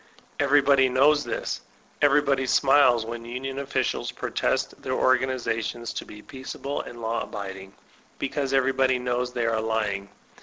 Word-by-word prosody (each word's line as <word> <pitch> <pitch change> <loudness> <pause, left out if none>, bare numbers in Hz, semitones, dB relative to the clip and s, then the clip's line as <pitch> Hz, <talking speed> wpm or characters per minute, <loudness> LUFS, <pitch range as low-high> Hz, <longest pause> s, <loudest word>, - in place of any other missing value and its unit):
Everybody 140 -2 +4
knows 145 +4 +4
this; 120 - -3 0.4
everybody 140 -2 +3
smiles 130 -3 +4
when 115 0 -6
onion 130 +3 -5
officiak 140 0 -2
protest - - -1
their - - -3
organizations 125 -3 0
to - - -5
be 105 - -12
peaceable 135 +1 -5
and 120 -1 -10
law 115 +1 -1
abiding, 95 -1 -7 0.4
because 140 0 -2
everybody 135 -1 +2
knows 125 0 -1
they 120 -2 -1
are 115 -1 +1
lying. 105 -3 -1
130 Hz, 130 wpm, -25 LUFS, 115-135 Hz, 0.4 s, Everybody